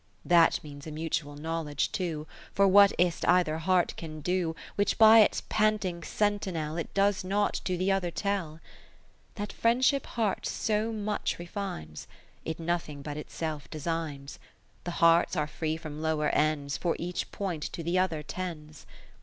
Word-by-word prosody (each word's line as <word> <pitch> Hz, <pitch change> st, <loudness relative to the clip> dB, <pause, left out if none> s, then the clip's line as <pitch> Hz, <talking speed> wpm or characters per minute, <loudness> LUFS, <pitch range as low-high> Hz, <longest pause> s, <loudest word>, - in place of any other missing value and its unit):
II -, -, -14 dB
That 170 Hz, -2 st, +5 dB
means 145 Hz, 0 st, -10 dB
a -, -, -6 dB
mutual 150 Hz, -1 st, -3 dB
Knowledge 155 Hz, -1 st, -2 dB
too; 165 Hz, -5 st, -3 dB, 0.3 s
For 200 Hz, 0 st, +5 dB
what 200 Hz, +1 st, +7 dB
is 175 Hz, -1 st, +2 dB
't -, -, -3 dB
either 175 Hz, -3 st, +3 dB
heart 180 Hz, +1 st, +2 dB
can 155 Hz, -2 st, -7 dB
do, 175 Hz, 0 st, 0 dB, 0.2 s
Which 205 Hz, 0 st, +1 dB
by 225 Hz, 0 st, +9 dB
its 215 Hz, -, +4 dB
panting 210 Hz, -5 st, +1 dB
sentinel 185 Hz, -6 st, -1 dB
It 170 Hz, -, -4 dB
does 200 Hz, -1 st, +2 dB
not 205 Hz, +2 st, +1 dB
to 180 Hz, -1 st, 0 dB
the 185 Hz, +2 st, +1 dB
other 190 Hz, -2 st, +1 dB
tell? 190 Hz, -3 st, -2 dB
in -, -, -17 dB, 0.8 s
That 205 Hz, -1 st, -5 dB
Friendship 255 Hz, +4 st, +2 dB
hearts 220 Hz, -4 st, -1 dB
so 215 Hz, +1 st, 0 dB
much 210 Hz, -1 st, -2 dB
refines, 170 Hz, -, -6 dB, 0.4 s
It 160 Hz, 0 st, -4 dB
nothing 165 Hz, -4 st, -3 dB
but 145 Hz, 0 st, -5 dB
itself 150 Hz, 0 st, -5 dB
designs: 155 Hz, -3 st, -4 dB
lo -, -, -24 dB, 0.4 s
The 175 Hz, -, -2 dB
hearts 165 Hz, +2 st, +5 dB
are 150 Hz, -3 st, +1 dB
free 155 Hz, +1 st, -3 dB
from 155 Hz, -2 st, -7 dB
lower 160 Hz, -1 st, +1 dB
ends, 145 Hz, -3 st, 0 dB
For 170 Hz, +3 st, 0 dB
each 175 Hz, +1 st, -4 dB
point 180 Hz, -6 st, -3 dB
to 165 Hz, -, -5 dB
the 175 Hz, +3 st, +1 dB
other 165 Hz, -5 st, 0 dB
tends. 155 Hz, -3 st, -7 dB
170 Hz, 170 wpm, -29 LUFS, 155-195 Hz, 0.8 s, by